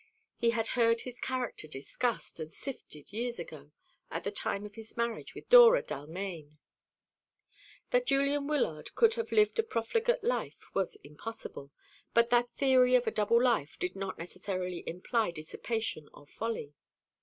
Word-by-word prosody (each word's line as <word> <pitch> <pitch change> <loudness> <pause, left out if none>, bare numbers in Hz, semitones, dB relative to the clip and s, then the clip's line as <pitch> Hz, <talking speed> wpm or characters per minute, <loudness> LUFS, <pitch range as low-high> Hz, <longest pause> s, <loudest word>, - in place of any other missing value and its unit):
He 235 - +2
had 230 -1 0
heard 230 -2 +3
his 250 -1 -8
character 255 -10 -3
discussed 160 - -3
and 160 0 -6
sifted 195 - -8
years 235 +2 -2
ago, - - -9 0.4
at - - -4
the - - -2
time 200 +1 -2
of 205 - -9
his 220 +2 -11
marriage 235 -1 -2
with - - -10
Dora - - +9
Dalmaine. 155 - -6 1.3
That - - +2
Julian 280 +1 +2
Wyllard 245 - -1
could 460 -1 +5
have 460 0 -3
lived 425 +2 +3
a - - +5
profligate 450 - 0
life 485 +3 -2
was 195 -2 0
impossible; 150 -2 -8 0.4
but 235 0 +4
that 240 0 +4
theory 255 0 +4
of 245 - +4
a - - +1
double 215 +2 +3
life 235 - +1
did 180 +1 -2
not 195 -1 -4
necessarily 180 0 -4
imply 215 +6 0
dissipation 170 +2 -4
or 145 - -14
folly. 215 -5 -4
230 Hz, 155 wpm, -31 LUFS, 180-255 Hz, 1.3 s, Dora